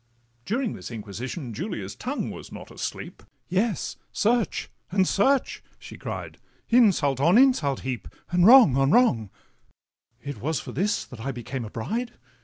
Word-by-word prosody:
During 235 +1 -1
this - - -8
inquisition, 120 - -6
Julia's 180 - -5
tongue 275 +4 -3
Was - - -10
not - - -10
asleep—'Yes, 195 +2 -4
search 230 -2 0 0.2
and 185 0 +2
search,' 265 +7 +1
she - - -11
cried, - - -7 0.3
'Insult 195 - +4
on 170 +9 +5
insult 245 - +3
heap, 130 -2 -4 0.2
and 175 0 +3
wrong 240 - +8
on 135 0 +3
wrong! 140 - +3 0.9
It 145 -1 -6
was 155 +3 -1
for - - -8
this 205 +2 -1
that 125 - -12
I 135 +5 -3
became 125 0 -5
a - - -7
bride! 225 - -3
175 Hz, 145 wpm, -25 LUFS, -, 0.9 s, wrong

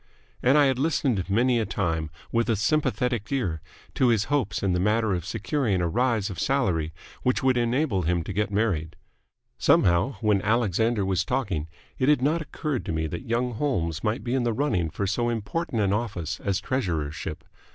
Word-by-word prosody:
And 130 +4 +4
I 145 - +6
had 130 -2 +1
listened 130 - 0
many 120 +4 +3
a 110 - 0
time 80 -5 -1 0.2
with 115 0 +1
a 115 - +3
sympathetic 125 -1 0
ear 95 - -1 0.3
to 130 - +2
his 115 -4 +3
hopes 130 -10 0
in 95 -2 +2
the 90 - +1
matter 105 +2 +2
of 90 -2 -2
securing 105 0 0
a 85 - +1
rise 115 0 +1
of 90 - -7
salary 90 - +1 0.3
which 125 +1 +1
would 130 -1 +4
enable 120 -3 +1
him 85 0 0
to 100 - -5
get 105 +1 0
married. 100 -7 -1 0.6
Somehow, 85 +9 +3
when 105 -3 +2
Alexander 110 0 +1
was 95 -1 +1
talking, 100 - -2 0.3
it 130 - +3
had 145 -4 +3
not 160 +4 +2
occurred 150 -3 -3
to - - -3
me 80 0 -1
that 115 - -6
young 120 +1 0
Holmes 85 - -1
might 110 +3 -1
be 120 - -2
in 130 - +2
the 120 -1 0
running 110 - 0
for 100 - -3
so 120 +5 0
important 115 +2 -2
an 100 0 +2
office 100 -7 -3
as 100 -1 -1
the - - -18
treasurership. 85 - -2
110 Hz, 195 wpm, -26 LUFS, 90-125 Hz, 0.6 s, I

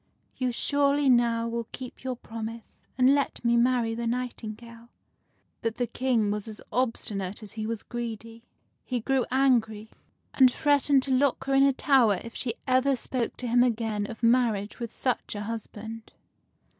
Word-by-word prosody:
You 255 -1 -1
surely 280 +2 +2
now 235 -1 +2
will 230 0 -3
keep 255 -1 -9
your 260 -1 -2
promise, 225 -1 -8
and 255 +1 +5
let 280 -3 -1
me 235 0 +4
marry 235 -1 +2
the 235 +1 -3
nightingale." 235 -1 -5 0.7
But 225 -1 -2
the 245 - 0
King 235 -4 0
was 210 +1 -3
as 215 -2 -7
obstinate 210 -4 -2
as 210 - -9
he 220 -1 -4
was 230 -1 -4
greedy. 230 -1 -6 0.4
He 250 -2 -2
grew 265 +2 0
angry, 230 -5 +1 0.4
and 260 -2 +6
threatened 285 -1 +3
to 270 - -3
lock 265 0 +2
her 270 0 -1
in 270 - +5
a 275 0 +6
tower 255 -8 +3
if 230 - -9
she 235 -3 -3
ever 260 +1 +3
spoke 245 -1 -2
to 250 - -4
him 240 +1 +4
again 225 -4 0
of 230 +1 -9
marriage 230 -4 +2
with 235 -2 -5
such 250 -4 -2
a 205 - -4
husband. 225 0 -7
235 Hz, 170 wpm, -27 LUFS, 225-255 Hz, 0.7 s, and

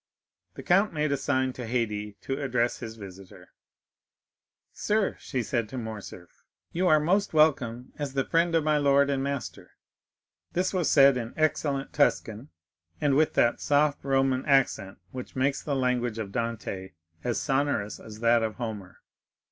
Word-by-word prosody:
The - - -8
count 195 +3 +3
made 150 -1 0
a - - +3
sign 130 -1 0
to 125 -2 -7
Haydée 105 -3 -2
to 135 +2 -3
address 125 -3 0
his 110 -2 -7
visitor. 95 -3 -12 1.2
"Sir," 210 -1 0
she 130 -4 -3
said 115 -2 -2
to 130 - -6
Morcerf, 110 -6 -8 0.3
"you 180 +2 0
are 155 -3 +5
most 180 +4 +1
welcome 130 -6 +2
as 145 -2 -3
the 135 -1 0
friend 165 0 +2
of 160 - +3
my 155 -1 +2
lord 140 0 +3
and 135 -1 0
master." 140 -1 -5 0.8
This 185 +2 0
was 180 -4 +1
said 140 -2 +6
in 115 -1 -5
excellent 145 -3 0
Tuscan, 125 -3 0 0.5
and 145 -2 +2
with 155 +3 +2
that 120 - +2
soft 145 0 +2
Roman 135 -1 +1
accent 135 -8 +2
which 125 -1 -8
makes 135 +1 0
the 145 - -2
language 125 -3 0
of 105 -3 -5
Dante 110 -5 -4 0.3
as 120 - -1
sonorous 135 -7 -1
as 110 0 -11
that 115 0 +4
of 110 -1 -2
Homer. 105 -6 -7
135 Hz, 160 wpm, -27 LUFS, 115-145 Hz, 1.2 s, said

